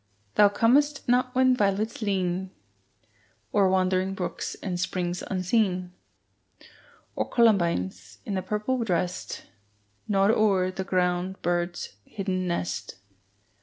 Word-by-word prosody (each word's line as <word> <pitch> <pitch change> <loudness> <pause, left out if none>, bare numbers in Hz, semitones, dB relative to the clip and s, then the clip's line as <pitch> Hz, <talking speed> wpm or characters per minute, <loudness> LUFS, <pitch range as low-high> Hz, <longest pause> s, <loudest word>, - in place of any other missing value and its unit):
Thou 205 -1 +6
comest 280 +9 +2
not 250 +1 +2
when 255 0 +4
violets 210 +1 0
lean 190 -2 -1 1.0
O'er 200 -2 +4
wandering 185 0 +1
brooks 185 - -4
and 180 -2 -4
springs 180 -1 -2
unseen, 185 -1 0 1.2
Or - - -2
columbines, 170 - +1
in 195 -3 -2
purple 210 +6 -1
dressed, 180 -3 -2 0.6
Nod 195 0 +3
o'er 195 -4 +2
the 190 +1 -4
ground 180 0 0
bird's 175 - -2
hidden 185 - -3
nest. 95 - -3
190 Hz, 105 wpm, -26 LUFS, 180-210 Hz, 1.2 s, Thou